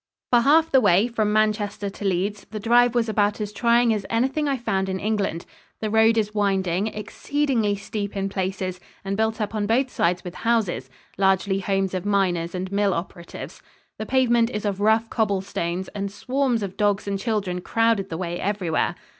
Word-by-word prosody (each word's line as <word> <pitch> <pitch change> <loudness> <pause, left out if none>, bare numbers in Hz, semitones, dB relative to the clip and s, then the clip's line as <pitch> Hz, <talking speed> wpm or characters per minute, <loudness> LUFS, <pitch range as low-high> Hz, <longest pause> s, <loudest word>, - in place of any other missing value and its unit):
For 240 - +6
half 315 +6 +4
the 265 - +5
way 200 +1 +4
from 220 -3 0
Manchester 210 -1 0
to 200 +1 -8
Leeds, 195 +2 -1
the 215 +1 -5
drive 240 +2 +4
was 235 -1 +2
about 210 -1 +1
as 210 -1 -4
trying 235 +1 +3
as 210 -2 -2
anything 265 +6 0
I 275 -1 0
found 190 -5 -1
in 190 0 -2
England. 200 -5 -1 0.3
The 215 -1 -3
road 220 +1 +4
is 210 -1 0
winding, 195 -2 +1
exceedingly 225 +1 -1
steep 200 0 -5
in 195 0 -1
places, 185 -1 -3 0.3
and 195 0 -1
built 220 +2 0
up 210 0 -2
on 210 -2 -1
both 250 +4 +1
sides 175 +1 0
with 180 - -7
houses 220 - 0 0.3
largely 190 0 +2
homes 195 -1 -1
of 185 -2 -2
miners 185 -4 0
and 185 +1 -4
mill 200 -1 +1
operatives. 170 0 -7 0.4
The 215 - -4
pavement 240 -3 +3
is 210 -3 -4
of 200 -1 -1
rough 220 +2 +3
cobble 205 -4 +1
stones, 180 -1 -3
and 200 -1 -4
swarms 250 +1 -1
of 190 -2 -6
dogs 205 -1 +1
and 200 -1 -1
children 200 -5 -2
crowded 225 -2 +1
the 160 - -4
way 175 -1 -3
everywhere. 190 -5 -1
205 Hz, 190 wpm, -23 LUFS, 190-225 Hz, 0.4 s, For